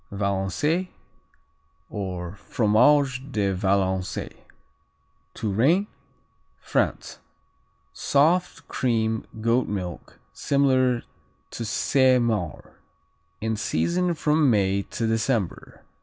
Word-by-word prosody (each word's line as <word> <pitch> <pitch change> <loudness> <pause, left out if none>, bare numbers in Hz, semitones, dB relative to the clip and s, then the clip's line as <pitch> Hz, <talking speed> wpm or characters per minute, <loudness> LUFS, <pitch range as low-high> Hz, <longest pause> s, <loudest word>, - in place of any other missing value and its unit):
Valençay, 100 - -1 1.0
or 90 -4 -5
Fromage 125 +6 +3
de 100 -4 0
Valençay 95 -1 -1 1.0
Touraine, 130 - +2 0.7
France - - -2 0.7
Soft; 165 +6 +1
cream; 110 -3 -1
goat 115 +3 +2
milk; 90 -5 -6 0.2
similar 130 -3 +2 0.5
to 115 - -5
Saint 130 +3 +3
Maure. 105 -9 -3 0.6
In 110 0 -1
season 170 - 0
from 150 -2 +2
May 100 -3 +2
to 115 - -2
December. 110 -3 -2
115 Hz, 80 wpm, -25 LUFS, 100-135 Hz, 1.0 s, Fromage